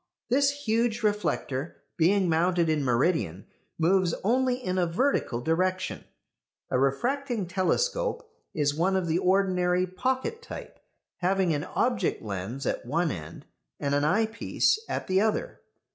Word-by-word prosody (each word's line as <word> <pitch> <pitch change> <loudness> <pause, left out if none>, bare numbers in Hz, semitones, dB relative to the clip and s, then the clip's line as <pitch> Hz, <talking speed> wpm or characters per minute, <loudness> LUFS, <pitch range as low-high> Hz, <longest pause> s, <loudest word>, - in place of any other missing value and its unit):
This 275 +3 +4 0.2
huge 230 +1 +1
reflector, 170 -9 -1 0.2
being 185 +3 +3
mounted 170 +1 +2
in 155 -2 +1
meridian, 125 - +1 0.3
moves 175 +1 +2
only 250 +4 +2
in 185 -8 -2
a 175 - +2
vertical 170 - 0
direction. 185 +6 -1 0.7
A 125 - +2
refracting 240 - 0
telescope 485 - 0 0.2
is 145 -2 +1
one 180 +5 +1
of 190 -2 +1
the 165 +1 +1
ordinary 185 -1 +2
pocket 260 - -2
type, 470 - -9 0.4
having 185 -1 +1
an 145 0 -2
object 240 -7 0
lens 105 +6 -5
at - - -1
one 160 +6 0
end 75 -7 -8 0.3
and 140 0 -1
an 145 0 +2
eyepiece 220 - +1
at - - -2
the 190 +1 +2
other. 220 - -1
185 Hz, 135 wpm, -27 LUFS, 160-220 Hz, 0.7 s, This